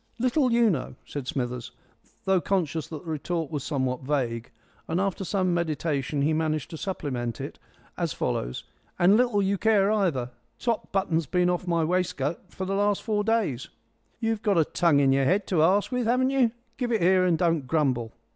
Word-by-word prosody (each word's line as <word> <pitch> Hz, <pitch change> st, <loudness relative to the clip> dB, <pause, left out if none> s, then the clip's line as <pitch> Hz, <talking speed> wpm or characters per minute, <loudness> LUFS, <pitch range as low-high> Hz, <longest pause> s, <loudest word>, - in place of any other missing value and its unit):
"Little 255 Hz, +2 st, +2 dB
you 235 Hz, -2 st, +4 dB
know!" 130 Hz, -6 st, -3 dB
said 140 Hz, -3 st, -6 dB
Smithers, 125 Hz, -2 st, -3 dB, 0.5 s
though 190 Hz, -2 st, +3 dB
conscious 165 Hz, -5 st, -1 dB
that 155 Hz, -3 st, -7 dB
the 160 Hz, -, -4 dB
retort 160 Hz, +1 st, -3 dB
was 145 Hz, -4 st, -3 dB
somewhat 130 Hz, -4 st, -1 dB
vague. 125 Hz, -4 st, -2 dB, 0.4 s
After 190 Hz, +3 st, 0 dB
some 185 Hz, -1 st, 0 dB
meditation 155 Hz, -4 st, -1 dB
he 155 Hz, +2 st, +2 dB
managed 155 Hz, 0 st, -1 dB
to 160 Hz, -, -6 dB
supplement 130 Hz, -, -3 dB
it -, -, -7 dB, 0.4 s
as -, -, 0 dB
follows: -, -, -2 dB, 0.3 s
"And 180 Hz, +4 st, +5 dB
little 235 Hz, -4 st, +3 dB
you 195 Hz, 0 st, 0 dB
care 210 Hz, -2 st, +3 dB
either 165 Hz, -, 0 dB, 0.3 s
top 235 Hz, -2 st, -2 dB
button's 170 Hz, -5 st, 0 dB
been 180 Hz, +2 st, +2 dB
off 180 Hz, +1 st, -3 dB
my 170 Hz, -2 st, +2 dB
wescut 165 Hz, -3 st, -1 dB
for 190 Hz, -, -5 dB
the 195 Hz, -, -2 dB
last 205 Hz, 0 st, +1 dB
four 210 Hz, -2 st, 0 dB
days." 205 Hz, -, 0 dB, 0.5 s
"You've 225 Hz, -2 st, -1 dB
got 205 Hz, -5 st, +2 dB
a 160 Hz, -, +4 dB
tongue 165 Hz, -4 st, +3 dB
in 135 Hz, -1 st, +4 dB
your 135 Hz, 0 st, +2 dB
head 190 Hz, +7 st, +2 dB
to 175 Hz, -5 st, +2 dB
ask 195 Hz, +8 st, +3 dB
with, 250 Hz, -2 st, 0 dB
haven't 255 Hz, +2 st, +2 dB
you? 265 Hz, -4 st, +3 dB, 0.3 s
Give 245 Hz, -2 st, -2 dB
it 220 Hz, -6 st, +1 dB
here 185 Hz, +1 st, +5 dB
and 175 Hz, -3 st, +3 dB
don't 165 Hz, -5 st, +1 dB
grumble." 130 Hz, -6 st, 0 dB
175 Hz, 185 wpm, -26 LUFS, 145-200 Hz, 0.5 s, And